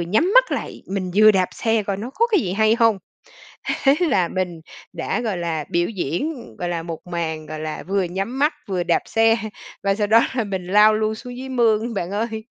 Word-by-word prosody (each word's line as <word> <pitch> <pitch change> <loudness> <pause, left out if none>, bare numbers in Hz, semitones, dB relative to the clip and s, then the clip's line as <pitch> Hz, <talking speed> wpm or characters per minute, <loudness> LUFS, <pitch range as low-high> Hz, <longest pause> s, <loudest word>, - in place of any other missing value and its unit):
nhắm 215 - +1
mắt - - +6
lại, - - -4
mình 190 -1 -3
vừa 215 +1 +7
đạp 185 -3 +2
xe 225 -1 +1
coi 200 -1 -2
nó 225 +6 -6
có 465 - +3
cái 425 -6 +2
gì 185 - -2
hay 220 +2 +3
hông? 230 -4 +3 0.9
Thế 275 - +6
là 200 - +2
mình 180 -3 -3 0.3
đã, 165 +5 -2
gọi 220 -5 -2
là, 165 -3 -2
biểu 175 0 +1
diễn, 230 - -4
gọi 175 - -3
là 170 -1 -2
1 165 +1 -7
màn, 160 -3 -4
gọi 155 0 -6
là, 155 0 -5
vừa 195 +4 0
nhắm 195 +8 -3
mắt 295 +3 +3
vừa 185 -3 -1
đạp 170 -1 +1
xe 225 0 +3 0.5
và 195 0 +2
sau 210 0 0
đó 225 +2 +6
là 240 - 0
mình 190 -3 -4
lao 210 +3 +5
luôn 215 0 0
xuống 245 +3 -9
dưới 265 +1 -7
mương, 230 -2 +1
bạn 180 -3 -3
ơi. 220 +2 -3
205 Hz, 220 wpm, -21 LUFS, 175-230 Hz, 0.9 s, vừa